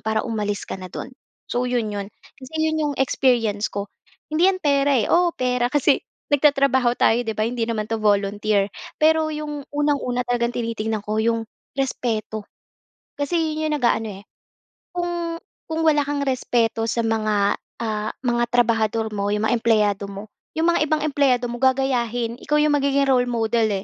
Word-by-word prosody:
para 220 0 +1
umalis 210 -3 -2
ka - - -5
na 185 - -7
do’n. 260 - -6 0.4
So, 245 +1 0
‘yon 240 -3 0
‘yon, 200 -1 -4 0.3
kasi 260 +2 -12 0.2
‘yon 315 - -1
‘yong 295 -2 0
experience 235 -6 +2
ko. 200 0 -4 0.4
Hindi 320 +4 +3
‘yan 370 - -6
pera, 280 -1 +3
eh, - - -1
oo, 345 0 +4
pera 250 -1 0
kasi 290 -1 +3 0.3
nagtatrabaho 275 -4 +3
tayo, 235 +2 +4
‘di 220 - 0
ba, 215 - +1
hindi 240 -1 -1
naman 215 -2 -2
‘to 225 - 0
volunteer. 205 0 +2 0.3
Pero 315 0 +4
‘yong 295 -1 -5
unang-una 285 -4 0
talagang 240 0 0
tinitingnan 225 -2 -2
ko, 215 +1 -2
‘yong 230 -1 0 0.3
respeto, 220 -5 -2 0.7
kasi 310 +1 0
‘yon 310 0 -1
‘yong - - +1
nag-aano, 225 -2 +2
eh, - - -30 0.7
Kung 345 -1 -2 0.3
kung 320 0 -1
wala 295 -2 +4
kang 285 0 -1
respeto 235 -3 +1
sa 235 - 0
mga, 215 -2 +1 0.3
ah, 215 -1 -2
mga 240 -1 +1
trabahador 225 -2 +2
mo, 200 0 -1
'yong 210 +1 0
mga - - +3
empleyado 210 -3 +2
mo, 200 +2 -8 0.3
yong - - +1
mga - - +1
ibang 305 0 0
empleyado 275 -5 +2
mo, 240 - -5
gagayahin. 245 -3 +1
Ikaw 300 - +1
'yong 300 - +3
magiging 280 0 +2
role 250 -2 +3
model, 225 -1 +1
240 Hz, 170 wpm, -22 LUFS, 220-285 Hz, 0.7 s, oo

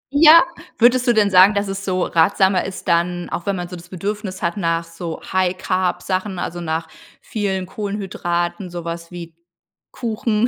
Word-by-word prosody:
Ja. 315 +3 +9 0.3
Würdest 250 +2 +4
du 240 - +5
denn 205 -3 +3
sagen, 190 +3 +7
dass 200 0 0
es 195 0 -4
so 185 -2 0
ratsamer 190 +3 +3
ist, 190 - -7
dann 175 +1 +1
auch 175 - -4
wenn 200 - +1
man 175 -1 -4
so 180 - -8
das 175 +1 -12
Bedürfnis 195 +1 -4
hat 170 +2 -1
nach 165 -3 0
so 165 0 -7
High-Carb 185 0 0
Sachen, 185 0 -2
also 175 0 -4
nach 160 0 -2 0.3
vielen 195 -3 -2
Kohlenhydraten, 185 -3 -3
sowas 170 -1 -6
wie 170 -2 -8 0.6
Kuchen,, 225 -1 0
185 Hz, 165 wpm, -20 LUFS, 175-205 Hz, 0.6 s, Ja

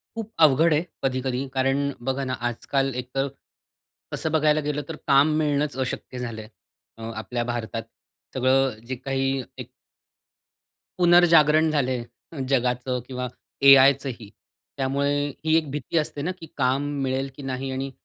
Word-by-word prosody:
खूप 225 -1 -6
अवघड 155 +3 +4
आहे 150 +2 +2 0.2
कधी-कधी 130 0 -1
कारण 135 +1 +1 0.3
बघा 135 +1 0
ना, 130 - -2
आजकाल 130 +3 -1
एक 125 0 -5
तर 135 +1 +1 0.9
तसं 160 - -2
बघायला 155 -1 +3
गेलं 150 0 -1
तर 160 - -4
काम 140 +3 +5
मिळणच 150 -2 0
अशक्य 125 0 -6
झालंय 110 -3 -6 0.5
अ, - - -12
आपल्या 120 +3 -3
भारतात 115 -1 -4 0.5
सगळं 130 -2 +2
जे 130 +2 -4
काही 135 +1 -1
एक - - -7 1.3
पुनर्जागरण 165 -3 +5
झालंय, 130 -5 0 0.5
जगाचं 125 -1 0
किंवा 125 -1 -4 0.4
एआयचंही 135 -4 +5 0.5
त्यामुळे 140 +2 0 0.2
ही 160 0 +3
एक 155 -3 -1
भीती 150 +3 -3
असते 150 -2 -1
ना, 170 +5 -1
की 180 -3 -10
काम 130 +1 +1 0.2
मिळेल 135 +1 -1
की 145 - -10
नाही 135 0 -3
आणि 135 +1 -4
135 Hz, 140 wpm, -24 LUFS, 125-150 Hz, 1.3 s, काम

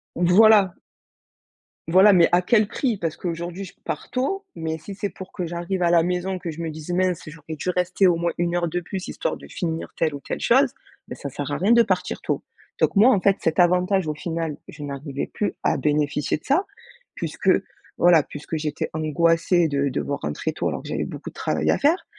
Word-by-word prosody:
Voilà 190 +2 +5 1.1
Voilà, 190 +4 +7
mais 175 -3 +6
à 175 - +5
quel 210 +3 +3
prix? 240 -1 -1
Parce 165 -4 -3
qu'aujourd'hui 175 +2 -4
je 185 - -10
pars - - -5
tôt, 385 +11 -1
mais 160 -1 -3
si 195 +5 -9
c'est 205 +1 -3
pour 190 +1 -11
que 180 - -4
j'arrive 175 +2 -3
à 170 - +3
la 170 -1 +5
maison 180 +2 -1
que 175 -2 -5
je 160 - -10
me 165 - -3
dise: 155 +1 -9
«Mince 180 -1 +1
j'aurais 155 0 -8
dû 155 - -4
rester 180 +1 +2
au 175 -2 +3
moins 170 0 -1
1 175 0 0
heure 175 -1 +1
de 175 +2 -2
plus 185 +2 -6
histoire - - -3
de - - -13
finir 165 -3 -4
telle 155 -3 0
ou 140 - -5
telle - - -5
chose». - - +4 0.3
Bah - - -7
ça 140 - -6
sert 140 +1 -5
à 145 - -1
rien 195 +5 +2
de 235 0 +7
partir 190 -4 -2
tôt, - - -2 0.4
donc - - +2
moi 225 +6 +7
en 205 -8 +3
fait 195 0 +3
cet 165 +2 0
avantage 180 +2 +3
au 155 - -1
final, 160 0 -4
je 150 - -9
n'arrivais 140 0 -5
plus 210 - -2
à - - +2
bénéficier 150 +1 0
de - - -23
ça 335 +9 +2 0.5
puisque - - -2 0.5
voilà, 175 -2 +6
puisque 150 +3 -6
j'étais 150 -1 -3
angoissée 165 +2 +2
de 140 0 0
devoir 140 +1 -2
rentrer 75 0 -2
tôt - - -2
alors - - -3
que - - -9
j'avais - - -2
beaucoup - - -7
de - - -18
travail - - 0
à - - +2
faire, 315 +7 +2
175 Hz, 220 wpm, -23 LUFS, 155-190 Hz, 1.1 s, Voilà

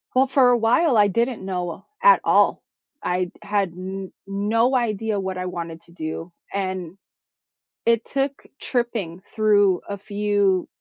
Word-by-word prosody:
Well, 265 +1 +5
for 260 -1 +4
a 245 - +4
while 240 +5 +3
I 205 -1 +6
didn't 230 +1 -1
know 180 0 -4 0.2
at - - +7
all. - - +3 0.4
I 180 +1 0
n 180 - -4
had 200 -2 0
n 190 +2 -6
no 220 +6 +1
idea 220 -4 0
what 190 -1 -4
I 185 - -3
wanted 170 -2 -5
to 170 - -20
do, 165 +1 -6 0.2
and 185 -2 -3 0.9
it 230 -1 +3
took 275 0 -2
tripping 225 -9 -2
through 205 -4 +3
a 200 -1 -4
few 205 -2 +1
200 Hz, 150 wpm, -23 LUFS, 185-230 Hz, 0.9 s, at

